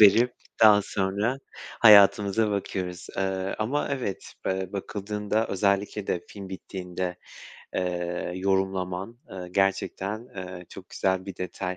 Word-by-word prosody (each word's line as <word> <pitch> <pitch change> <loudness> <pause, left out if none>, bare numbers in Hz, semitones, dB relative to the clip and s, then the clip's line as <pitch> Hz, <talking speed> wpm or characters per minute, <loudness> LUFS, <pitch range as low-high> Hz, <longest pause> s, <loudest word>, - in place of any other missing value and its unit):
verip 110 +4 +7 0.3
daha 105 -2 +8
sonra 100 +6 -1 0.4
hayatımıza 105 0 +7
bakıyoruz. 90 -3 -3
Eee, 95 0 -1
ama 130 +7 0
evet, 125 -9 -3
eee, 95 0 -1
bakıldığında 105 +2 -2
özellikle 100 +1 0
de 90 - 0
film 100 -2 -9
bittiğinde, 90 -1 -5 0.6
eee, 90 -1 -2
yorumlaman, 95 +2 -1
eee, 90 -1 -7
gerçekten, 100 +4 0
eee, 90 -1 -7
çok 95 -2 -11
güzel 95 -1 0
bir 95 - -6
detay. 90 0 -4
95 Hz, 115 wpm, -27 LUFS, 95-105 Hz, 0.6 s, daha